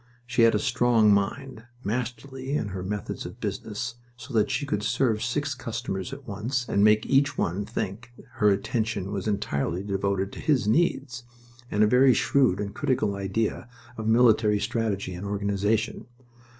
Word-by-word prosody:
She 125 0 0
had 115 -1 +6
a - - +4
strong 120 -2 +3
mind 115 +4 -2 0.2
masterly 130 +4 -3
in 105 - -3
her 95 -1 -5
methods 105 +3 -4
of - - -9
business 110 +3 -4 0.2
so 125 +3 -10
that 110 -2 +2
she 145 - -1
could 105 -7 -1
serve 110 0 +1
six 145 +5 -1
customers 115 -6 -4
at 135 0 -9
once 120 +5 -2
and 100 - +2
make 105 0 +5
each 140 +1 +2
one 95 +4 -1
think 115 +5 -4
that - - -15
her 105 - +4
attention 105 0 -1
was 100 0 -3
entirely 90 -3 -1
devoted 100 -1 -1
to - - -9
his 130 -8 +1
needs 130 -2 +1 0.5
and 105 - +2
a - - +7
very 125 +3 +5
shrewd 130 -9 +2
and 100 -1 -4
critical 130 -8 0
idea 100 +4 -2 0.3
of 110 -1 -4
military 110 -2 +4
strategy 100 -5 -2
and 90 +3 -6
organization. 105 +3 -1
110 Hz, 165 wpm, -26 LUFS, 100-125 Hz, 0.5 s, a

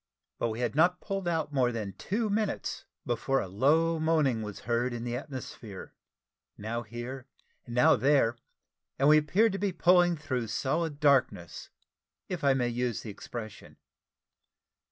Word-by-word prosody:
But 115 - 0
we 110 +2 -4
had 120 -3 0
not 175 +4 +3
pulled 195 -3 -4
out 160 -3 -1
more 125 -3 +2
than 105 -4 -4
two 220 - -2
minutes, 210 0 -2 0.2
before 135 +3 0
a 100 - -3
low 160 - +2
moaning 155 -7 +2
was 105 -2 -7
heard 120 +2 0
in 120 -1 -5
the 120 0 -3
atmosphere 125 -7 -8 0.6
now 115 +3 -3
here, 120 +4 -7 0.4
now 120 +1 +4
there 130 -2 +3 0.6
and 135 - +3
we 155 0 +7
appeared 200 +9 +2
to 195 - -4
be 200 0 0
pulling 175 0 +4
though 125 -4 -1
solid 145 +7 -1
darkness, 125 - +1 0.6
if 180 -4 -4
I 140 -1 +4
may 125 -2 +1
use 120 -1 -2
the 110 - -6
expression. 110 0 -9
130 Hz, 155 wpm, -29 LUFS, 115-160 Hz, 0.6 s, we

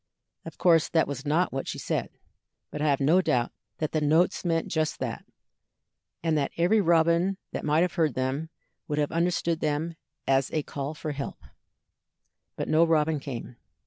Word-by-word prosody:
Of 165 - -9
course 165 -4 +4
that 160 - +2
was 140 0 -5
not 160 +2 +2
what 135 - -3
she - - -4
said, - - -2 0.6
but 150 - -5
I 155 - +2
have 140 - +2
no 155 +7 +4
doubt 125 -8 +1 0.3
that 155 - -2
the 155 - 0
notes 160 +4 +2
meant 165 -2 0
just 155 -1 -1
that, - - -4 1.0
and 165 -2 +2
that 140 - 0
every 185 +6 +4
robin 170 +2 +3
that - - -4
might 150 +2 +3
have 180 0 +1
heard 160 -7 +1
them 130 +5 -2 0.4
would 150 - -2
have 145 -1 0
understood 170 -1 0
them 155 +2 -1 0.3
as 135 0 +3
a 155 - 0
call 140 +2 -5
for 150 0 -4
help. 140 -1 -6 1.1
But - - -3
no 155 +1 +4
robin 160 -2 +2
came. 125 -3 -7
155 Hz, 175 wpm, -27 LUFS, 145-170 Hz, 1.1 s, course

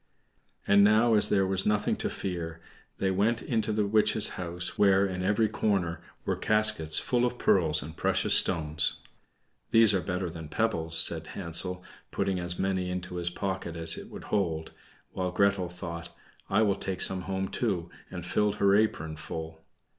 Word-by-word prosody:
And 100 0 +5
now, 110 +3 +4
as 105 - +5
there 95 -2 +2
was 95 0 0
nothing 105 0 +1
to - - -2
fear, 85 -3 -5 0.4
they 95 - 0
went 110 +5 0
into 110 -3 -1
the 105 -1 0
witch's 105 +1 +3
house, 85 -1 -4
where, 100 -1 +4
in 90 -1 -4
every 105 +4 +2
corner, 100 -5 -1 0.2
were - - 0
caskets 105 -7 +3
full 125 -2 +1
of 125 0 -1
pearls 80 - +2
and 80 +3 -9
precious - - +1
stones. 80 -3 +2 0.7
"These 115 -2 +5
are 95 - +1
better 90 +1 -3
than 80 -2 -9
pebbles," 80 -5 0
said 80 0 +2
Hansel, 90 0 -3 0.3
putting 95 -2 -1
as 85 0 -3
many 95 -1 -1
into 90 0 -5
his 85 0 +3
pocket 95 -2 -4
as 80 -1 +2
it - - -9
would - - -10
hold; 80 -6 -1 0.4
while 90 -1 -2
Gretel 95 -1 +1
thought, 85 -1 -7 0.4
"I 105 +3 +3
will 100 -2 +1
take 95 -1 -3
some 95 -1 +1
home 95 +1 -3
too," 95 -8 -2 0.2
and 90 -2 -7
filled 105 +2 0
her 100 -1 +3
apron 80 -7 0
full. 80 +1 -7
95 Hz, 170 wpm, -28 LUFS, 85-105 Hz, 0.7 s, And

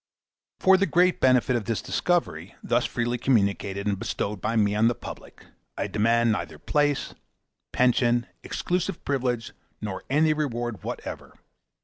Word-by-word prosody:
For 190 0 +6
the 200 +1 +1
great 180 +1 +3
benefit 130 0 +4
of 115 -3 -2
this 115 +1 -1
discovery, 125 - -1
thus - - +1
freely 120 +1 -2
communicated 100 -5 +1
and 100 -2 0
bestowed 100 -1 -3
by 115 +2 -1
me 105 -2 +3
on 110 +2 +3
the 120 - +1
public, - - -10 0.3
I - - -1
demand 115 +2 +2
neither 110 - -3
place, 145 -2 0 0.6
pension, 120 -1 +2 0.2
exclusive 175 -2 -2
privilege, 125 -4 -1 0.3
nor 105 -3 -5
any 155 +3 +3
other 155 - -1
reward 120 -6 -2
whatever. - - -7
120 Hz, 145 wpm, -26 LUFS, 105-145 Hz, 0.6 s, For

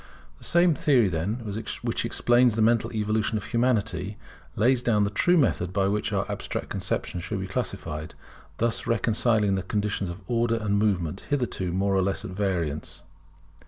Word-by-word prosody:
The - - -15
same 175 -1 +4
theory 140 - +3
then 85 +5 -1 0.5
which 115 -1 -1
explains 120 0 +3
the 110 - 0
mental 115 0 +2
evolution 110 0 0
of 105 - -5
Humanity, 110 -5 0 0.4
lays 125 +2 +3
down 110 -4 +2
the 100 - 0
true 175 - +3
method 100 - +1
by 95 0 +1
which 105 +1 -1
our 95 -1 0
abstract - - -4
conceptions 90 - -3
should 105 +1 -3
be 95 - -3
classified; 90 -8 -4 0.4
thus 115 0 0
reconciling 110 -2 +2
the 95 - 0
conditions 100 0 -2
of 85 +3 -7
Order 115 -1 +1
and 105 -2 0
Movement, 95 -5 0
hitherto 125 - -1
more 100 +2 +1
or 95 - +3
less 95 +1 -1
at - - -6
variance. 90 -7 -2
105 Hz, 165 wpm, -26 LUFS, 95-115 Hz, 0.5 s, same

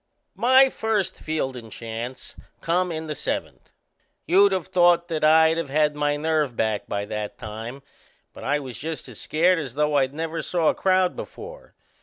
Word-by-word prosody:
My 260 +2 +5
first 210 -4 -1
fieldin' 130 -7 -4
chance 115 +3 -7 0.2
come 180 +2 0
in 160 0 -4
the 155 - -3
seventh. - - -5 0.6
You'd 195 +3 +5
of 185 -3 -1
thought 175 -2 +3
that 160 -2 -2
I'd 160 +1 +5
of 165 - -4
had 150 +1 +2
my 145 0 0
nerve 150 -4 0
back 110 -2 -1
by 100 0 -2
that 105 0 -5
time; 115 +4 -7 0.5
but - - -11
I 145 +2 +1
was 130 -4 -7
just 160 +1 -5
as - - -11
scared 175 +3 +2
as 135 -5 -6
though 150 0 +1
I'd 135 0 +1
never 165 +1 -3
saw 170 -3 +1
a - - +2
crowd 185 -1 +2
before. - - -10
155 Hz, 175 wpm, -24 LUFS, 135-175 Hz, 0.6 s, My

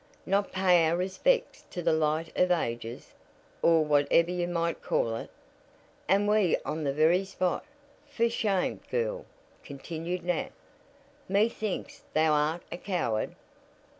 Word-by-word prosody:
"Not 200 +1 +1
pay 180 -3 +4
our 165 +2 +1
respects 195 - 0
to 175 - -5
the 165 -1 +3
light 155 +1 0
of 180 - +3
ages 120 -8 -2 0.5
or 165 -2 +4
whatever 150 +3 +3
you 175 -1 -1
might 170 -1 -1
call 115 -1 0
it? - - -6 0.8
And 200 +2 +3
we 210 -4 +3
on 155 +1 -3
the 140 - +1
very 160 +6 +3
spot! 185 -2 -2 0.5
For 235 -5 +1
shame, 205 -5 0
girl!" - - -2 0.4
continued 165 +5 -5
Nat. 175 -2 -1 0.8
"Methinks 210 0 -1
thou 155 0 +4
art 150 +3 +1
a - - -4
coward." 170 - -2
175 Hz, 135 wpm, -29 LUFS, 155-195 Hz, 0.8 s, pay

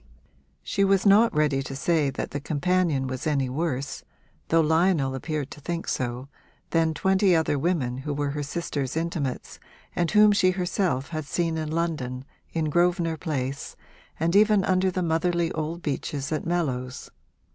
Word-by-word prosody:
She 200 - 0
was 195 0 +3
not 210 +4 +6
ready 150 -3 +1
to 135 0 -6
say 155 0 +1
that 135 - -4
the 145 - -3
companion 155 -1 0
was 130 +2 -4
any 140 -4 +1
worse, 140 -1 -3 0.4
though 165 - +3
Lionel 160 -3 +2
appeared 150 +1 -3
to 150 - -10
think 170 +3 -4
so, 125 +1 -2 0.4
than 165 -1 +2
twenty 190 +2 +3
other 160 -3 +1
women 135 -6 0
who 140 +3 -4
were 145 0 -1
her 145 +1 -3
sister's 145 -2 -3
intimates 160 -6 -3 0.4
and 170 -2 +1
whom 210 0 +6
she 200 -2 +4
herself 180 -6 -1
had 155 -3 -4
seen 165 +2 -1
in 155 -1 -3
London, 150 -6 -2 0.3
in 155 -2 -1
Grosvenor 175 -1 +2
Place, 140 -4 -4 0.4
and 170 +3 +1
even 210 -2 +5
under 185 0 +2
the 185 0 -2
motherly 170 +1 +1
old 160 +2 -4
beeches 140 0 -3
at 155 +1 -2
Mellows. 130 -8 -2
160 Hz, 160 wpm, -26 LUFS, 140-175 Hz, 0.4 s, not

